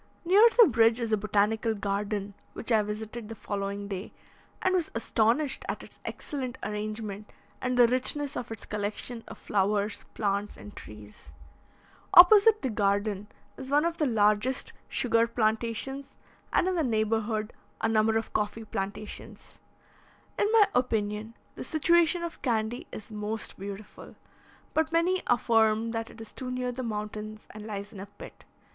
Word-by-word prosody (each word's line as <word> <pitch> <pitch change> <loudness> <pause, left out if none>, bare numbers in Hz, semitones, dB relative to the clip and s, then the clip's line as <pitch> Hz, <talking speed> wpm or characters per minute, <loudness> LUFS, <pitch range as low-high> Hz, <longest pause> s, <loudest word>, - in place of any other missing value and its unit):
Near 385 +5 +6
the 470 - +10
bridge 230 -2 +4
is 230 -2 -2
a - - +4
botanical 215 +2 +1
garden 200 0 -2 0.2
which 240 - -4
I 220 -2 +5
visited 215 +2 -6
the 225 - -6
following 200 -1 -4
day, 195 -1 -5 0.5
and 370 - +1
was 355 -4 +1
astonished 230 +5 +1
at - - -3
its - - -15
excellent 260 -3 -5
arrangement, 210 -1 -4 0.3
and 250 -1 -1
the 245 - +8
richness 265 +3 0
of 235 - -5
its 225 - -7
collection 210 +3 -4
of - - -9
flowers, 205 +1 0
plants, 200 -1 -1
and 205 - -11
trees. 105 -8 -12 0.8
Opposite 415 +3 +8
the 260 - 0
garden 205 0 0 0.3
is 265 0 -8
one 295 +3 +3
of 335 0 -2
the 300 - +2
largest 215 +2 +2 0.2
sugar 230 -2 +2
plantations, 235 +4 -2 0.3
and, - - +2
in 375 - +1
the 335 -3 +1
neighbourhood, 220 -2 0 0.3
a 225 - +1
number 220 0 +3
of 225 - -4
coffee 220 +1 -2
plantations. 205 0 -6 0.8
In 415 - +1
my 450 -2 +7
opinion, 220 -2 -1 0.2
the - - -7
situation 340 +2 +3
of 340 -1 -6
Candy 230 -1 -1
is 215 - -9
most 215 0 -4
beautiful, 200 +2 -9 0.6
but 315 0 +1
many 350 +3 +2
affirm 225 -1 +3
that 225 0 -3
it - - -14
is 225 -1 -9
too 255 - -5
near 250 0 -2
the 250 +1 -5
mountains, 215 -1 -5
and 215 0 -9
lies 200 0 -6
in 200 - -9
a 195 - -7
pit. 205 - -13
225 Hz, 155 wpm, -28 LUFS, 210-255 Hz, 0.8 s, the